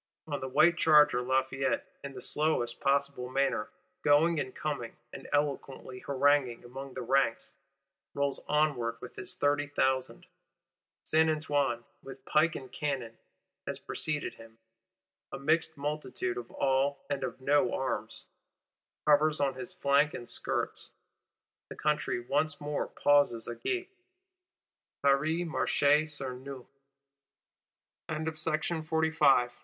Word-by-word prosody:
On 145 -2 -3
the 130 - -4
white 170 +6 +4
charger, 150 -5 +6
Lafayette, 130 +1 0
in 140 -1 -6
the 125 - -8
slowest 150 -6 0
possible 140 -2 +1
manner, 135 -5 0 0.3
going 150 +3 +4
and 130 - -4
coming, 140 -7 -4 0.2
and - - -9
eloquently 140 -3 -2
haranguing 140 -3 +2
among 135 +2 -9
the 130 - -4
ranks, 135 +1 +1 0.6
rolls 140 -1 0
onward 140 -6 +1
with 125 - -10
his 185 - -5
thirty 145 0 +1
thousand. 130 -2 0 0.8
Saint 160 0 +3
Antoine, 145 -6 0 0.2
with 135 0 -11
pike 155 +2 +3
and 130 -2 -8
cannon, 130 -7 -3 0.5
has - - -2
preceded 150 -1 -2
him; 115 0 -15 0.7
a - - -5
mixed 160 +3 +1
multitude, 150 - -3
of 390 - -6
all 135 +1 0
and 140 -1 -2
of - - -4
no 145 +2 +3
arms, 130 0 -3 0.8
hovers 150 +1 +4
on 140 -2 +1
his 180 +8 -6
flanks 145 -4 +2
and 120 - -7
skirts; - - -2 0.8
the - - -7
country 150 -4 0
once 145 +4 -1
more 145 0 -2
pauses 145 -5 +2
agape: 365 - -3 1.1
Paris 155 +5 +2
marche 160 - -1 0.2
sur 140 -4 -5
nous. 130 0 -9 1.4
Chapter 160 0 -2
1.7. 155 -4 +2
140 Hz, 125 wpm, -30 LUFS, 130-155 Hz, 1.4 s, charger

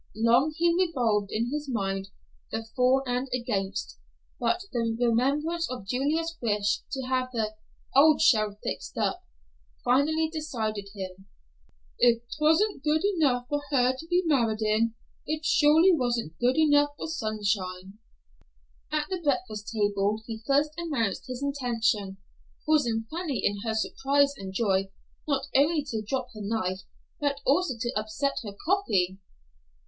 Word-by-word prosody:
Long 235 +7 +3
he 340 0 +3
revolved 240 - +1
in 230 +3 -1
his 295 -1 -3
mind 195 -4 -2 0.4
the 225 0 -4
for 260 +1 +3
and 250 +2 -1
against, 195 - -3 0.4
but 355 +10 +1
the 230 -2 -1
remembrance 280 +8 +1
of 250 -6 -6
Julia's 315 +8 -1
wish 210 -3 +1
to 265 - -2
have 255 0 -1
the 220 -3 -2 0.4
"old 300 +2 +6
shell 215 -3 +3
fixed - - -5
up," - - 0 0.6
finally 305 +6 +3
decided 225 -11 -4
him. 190 0 -7 0.7
"If 235 -1 +4
'twasn't 315 +3 +2
good 310 +1 +2
enough 255 -7 +2
for 290 +1 -1
her 255 -3 +3
to 320 +5 -10
be 355 +1 +2
married 230 -8 +2
in, 220 +1 +1 0.3
it 310 +1 -2
surely 310 +5 +5
wasn't 240 - -1
good 250 +4 +2
enough 290 -2 +5
for - - -5
Sunshine." 205 - -3 0.9
At 305 -1 0
the 370 -2 -3
breakfast 245 -7 -1
table 205 -1 +1
he 225 -1 -6
first 285 +2 +3
announced 275 - -2
his 255 +1 -5
intention, 230 -8 0 0.5
causing 240 -8 +2
Fanny 320 -5 -2
in 205 0 +1
her 225 -1 -1
surprise 280 +5 +2
and 195 -6 -7
joy 195 -1 +1 0.4
not 275 -2 0
only 295 +3 +4
to 220 -2 -2
drop 255 +4 -3
her 215 - -8
knife, 200 -3 -2 0.4
but 285 -1 0
also 290 0 +2
to 240 +1 -2
upset 215 +7 -1
her 205 -2 -7
coffee. 200 - +1
245 Hz, 145 wpm, -27 LUFS, 215-295 Hz, 0.9 s, old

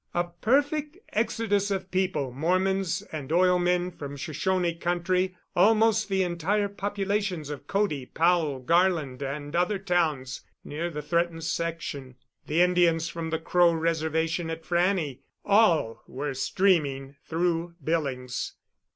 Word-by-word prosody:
A 175 - +3
perfect 285 - 0 0.2
exodus 215 -2 0
of 190 -1 -3
people 185 -8 0
Mormons 185 +5 0
and 150 -2 -6
oil 180 +1 +4
men 180 0 +1
from 145 -4 -8
Shoshone 175 +4 -1
country, 180 +2 -1 0.2
almost 215 +3 +4
the 190 -1 +2
entire 185 +4 0
populations 200 -5 -2
of 145 -1 -8
Cody, 195 -11 0
Powell, 165 -4 +2
Garland, 165 -3 +1
and 145 +2 -4
other 180 +4 +2
towns 160 -9 -1 0.2
near 165 +4 -4
the 150 -3 -6
threatened 170 +1 0
section, 160 -6 -3 0.3
the 160 +3 +2
Indians 175 -2 +3
from 165 -1 -5
the 160 - 0
Crow 170 +1 +3
Reservation 160 0 0
at 165 0 -5
Frannie 175 -6 +1 0.3
all 175 - +3
were 140 +1 -4
streaming 140 -3 +1
through 170 0 -1
Billings. 135 -5 -2
170 Hz, 125 wpm, -27 LUFS, 155-190 Hz, 0.3 s, oil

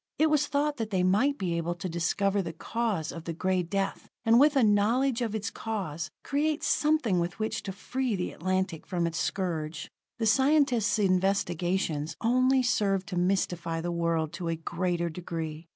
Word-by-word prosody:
It 310 0 +3
was 295 -1 +3
thought 290 +1 0
that 225 -3 -3
they 185 -4 +1
might 215 +10 +3
be 175 -3 -1
able 170 +1 -2
to 175 - -5
discover 195 +4 0
the 165 -3 -5
cause 205 -2 -2
of 165 -1 -8
the 170 - -3
Gray 185 +2 0
Death, 195 +3 -3 0.2
and 225 +1 +6
with 295 +2 +5
a 265 - +4
knowledge 230 +5 +3
of 225 -3 -1
its 220 +1 -3
cause, 190 -8 -4
create 300 +2 0
something 305 - +2
with 175 +2 -2
which 220 0 -2
to 195 - -5
free 245 +4 -2
the 180 - -3
Atlantic 185 -2 -2
from 175 -2 0
its 165 -1 -2
scourge. 165 -5 -3 0.3
The 230 - -1
scientists' 265 -4 +3
investigations 180 -5 0
only 255 +3 +3
served 200 -6 +1
to 185 - -4
mystify 175 -2 0
the 175 +1 -3
world 170 -2 0
to 175 0 -4
a 165 - 0
greater 170 +1 -2
degree. 165 -1 -5
190 Hz, 180 wpm, -28 LUFS, 170-235 Hz, 0.3 s, and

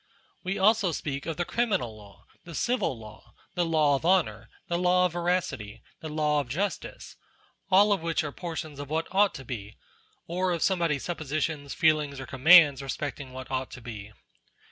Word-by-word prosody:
We 190 +1 -3
also 205 -1 +3
speak 140 -2 -4
of 165 - -3
the 175 - -1
criminal 195 - -1
law, 100 -2 -16 0.2
the 170 -2 -10
civil 240 - 0
law, 110 -1 -14 0.2
the 175 - +1
law 155 -3 +3
of 135 - -1
honour, 140 - +1 0.2
the 170 0 -1
law 180 0 +3
of 180 - 0
veracity, 170 - -2 0.2
the 160 - -7
law 150 -1 +1
of 140 -4 -4
justice; 190 +9 -4 0.5
all 205 +2 +6
of 195 - -2
which 165 0 0
are 145 - -4
por 170 +1 -6
tions 155 -3 -6
of 145 -1 -7
what 160 +2 -1
ought 200 +1 +3
to 135 - -8
be, 110 -4 -7 0.5
or 180 +1 -1
of 170 - -1
somebody's 170 -7 +1
suppositions, 155 -3 -3
feelings, 150 -3 +2
or 135 - -6
commands 145 0 +6
respecting 135 0 -5
what 130 +1 -9
ought 130 0 -2
to 125 - -10
be. 110 -3 -8
155 Hz, 185 wpm, -27 LUFS, 135-180 Hz, 0.5 s, all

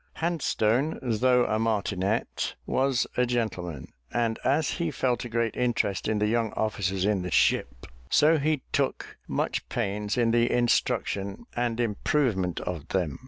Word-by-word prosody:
Handstone, 150 -5 0
though 125 +1 +3
a 110 - 0
martinet, 105 -2 -1
was 135 -2 +1
a 125 - +4
gentleman; 90 - -3 0.2
and 115 -2 0
as 145 +2 +2
he 170 - +1
felt 130 -4 0
a - - -6
great 115 -1 0
interest 115 -6 0
in 110 0 +1
the 105 - +1
young 115 0 +1
officers 95 -3 -1
in 105 -2 +1
the 90 - -4
ship, - - +1 0.2
so 155 +1 +5
he 150 -1 0
took - - -1
much - - -2
pains 105 +3 -2
in 115 -2 +3
the 120 +1 +3
instruction 100 -4 0
and 120 -1 -1
improvement 105 - 0
of 85 -4 -5
them. 85 -7 -1
115 Hz, 150 wpm, -27 LUFS, 100-125 Hz, 0.2 s, so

